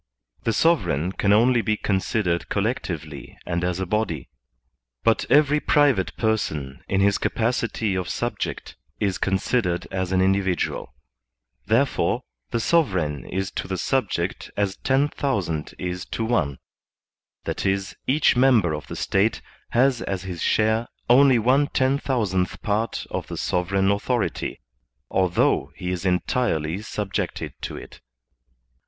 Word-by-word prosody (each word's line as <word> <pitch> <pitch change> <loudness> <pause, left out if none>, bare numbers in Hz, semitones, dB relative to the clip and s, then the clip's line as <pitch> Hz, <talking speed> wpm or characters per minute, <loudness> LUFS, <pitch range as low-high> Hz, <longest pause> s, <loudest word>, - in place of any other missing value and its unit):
The 115 - +2
sovereign 95 - +2
can 100 +1 +1
only 120 +3 +5
be 110 -1 0
considered 95 -3 0
collectively - - -3
and 85 0 -2
as 90 0 -1
a 95 - -1
body; 90 - -2 0.7
but 115 - +2
every 150 +2 +5
private 140 -11 +2
person, 80 - -1
in 95 0 +1
his 100 0 +3
capacity 115 -2 0
of 95 -1 -2
subject, - - -3 0.2
is 100 -3 0
considered 95 -2 0
as 95 -1 -2
an 95 - +2
individual; 95 -1 0 0.7
there 115 +6 +4
fore, - - -1 0.3
the 115 - -1
sovereign 95 - +1
is 95 +1 -3
to - - -4
the 95 -1 -2
subject 95 -5 -1
as 100 -2 0
ten 135 +2 +2
thousand 95 - -2
is 90 0 -4
to 115 - -2
one, 85 - 0 0.9
that - - -3
is, 95 0 -1
each 145 +2 +4
member 120 -10 +4
of 75 - -5
the - - -6
State 100 +3 +1 0.3
has 125 0 +3
as 95 -1 -3
his 90 -3 -6
share 110 +2 +2 0.2
only 135 0 +7
one 130 +6 +3
ten 135 -1 +1
thousandth 100 -10 -1
part 110 +2 -1
of - - -3
the - - -6
sovereign 95 +2 +1
authority, 105 - -1 0.5
although 90 -2 +2
he 90 0 -4
is 90 +1 -2
entirely 90 -3 0
subjected 105 -2 -3
to - - -5
it. - - -11
100 Hz, 135 wpm, -24 LUFS, 90-120 Hz, 0.9 s, only